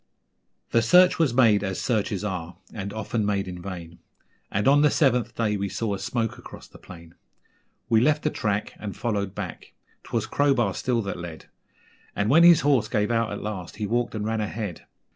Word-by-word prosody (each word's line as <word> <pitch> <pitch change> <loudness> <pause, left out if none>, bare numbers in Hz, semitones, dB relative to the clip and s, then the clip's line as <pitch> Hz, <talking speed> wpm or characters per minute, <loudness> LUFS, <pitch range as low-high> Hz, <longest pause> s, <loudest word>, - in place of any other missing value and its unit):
The 115 - +4
search 180 +11 +5
was 160 -6 +3
made 115 -5 +4
as 95 -2 -3
searches 105 -4 -1
are 90 -4 -5 0.2
(and 100 -2 -5
often 110 +1 -2
made 100 -1 -1
in 90 -1 -7
vain), 85 -3 -8 0.5
And 105 +4 -1
on 145 +1 +6
the 150 - +5
seventh 125 -7 +1
day 105 -3 0
we 100 0 -2
saw 110 0 -2
a 100 - -4
smoke 115 +3 -2
across - - -12
the - - -16
plain; 85 -2 -13 0.7
We 110 -1 +3
left 150 +3 +2
the 150 - +1
track 105 -1 -2
and 105 -2 -6
followed 100 -4 -2
back 95 -5 -7 0.3
'twas - - -2
Crowbar 130 -8 +1
still 120 +1 -1
that 100 -2 -5
led, 85 -2 -9 0.7
And 100 +2 0
when 160 +4 +6
his 170 -2 +7
horse 140 -6 +2
gave 105 +1 0
out 115 -2 0
at 105 - -5
last 100 -4 -6
he 105 0 -3
walked 120 +2 -1
and 105 -1 -3
ran 110 0 -1
ahead. 105 -4 -5
105 Hz, 195 wpm, -25 LUFS, 100-120 Hz, 0.7 s, his